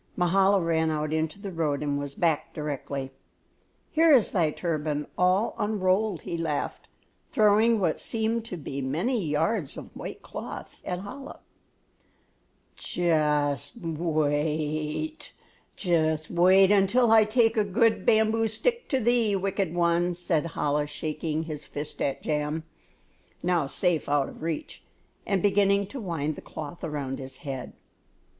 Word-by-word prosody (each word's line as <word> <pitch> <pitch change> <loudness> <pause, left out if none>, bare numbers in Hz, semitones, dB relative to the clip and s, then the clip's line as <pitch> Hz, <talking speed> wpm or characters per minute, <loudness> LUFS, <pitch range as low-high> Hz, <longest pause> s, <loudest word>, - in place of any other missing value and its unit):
Mahala 190 +2 +3
ran 165 -2 +1
out 155 0 -1
into 160 +3 -1
the 200 -1 -6
road 150 -4 -1
and 145 -1 -1
was 145 -1 -5
back 165 -4 0
directly. 140 -3 -4 0.8
"Here 325 +1 +5
is 255 -7 +5
thy 170 -5 +2
turban 150 -2 -2
all 185 +5 +2
unrolled," 205 -2 +1
he 170 - -4
laughed, 155 -3 -3 0.4
throwing 215 +1 +4
what 170 -5 0
seemed 225 0 -1
to 185 -6 -6
be 140 -3 -5
many 180 - -1
yards 160 +2 -1
of - - -10
white - - -7
cloth - - -8
at 180 +1 -4
Chola. 275 +7 -9 1.4
"Just 150 -4 0 2.6
wait 185 +3 +5
until 210 +4 +4
I 220 -1 +7
take 225 +1 +2
a 215 - +3
good 220 +3 +2
bamboo 220 +1 +3
stick 470 - -1
to 265 - +2
thee, 235 -3 +2
wicked 195 -2 -1
one," 175 0 +2
said 170 -2 0
Chola, 150 0 0
shaking 155 +1 -3
his 155 -2 -6
fist 145 +1 -6
at 135 - -1
Jam, 150 +1 -1 0.8
now 175 -5 +1
safe 170 +1 0
out 145 -1 +2
of - - -13
reach, 160 -1 -4 0.4
and 195 -3 +1
beginning 200 0 +3
to 270 - -6
wind 160 -6 -2
the - - -9
cloth 155 +2 -8
around 145 -4 -3
his 130 -1 -8
head. 135 -3 -5
175 Hz, 135 wpm, -27 LUFS, 150-205 Hz, 2.6 s, I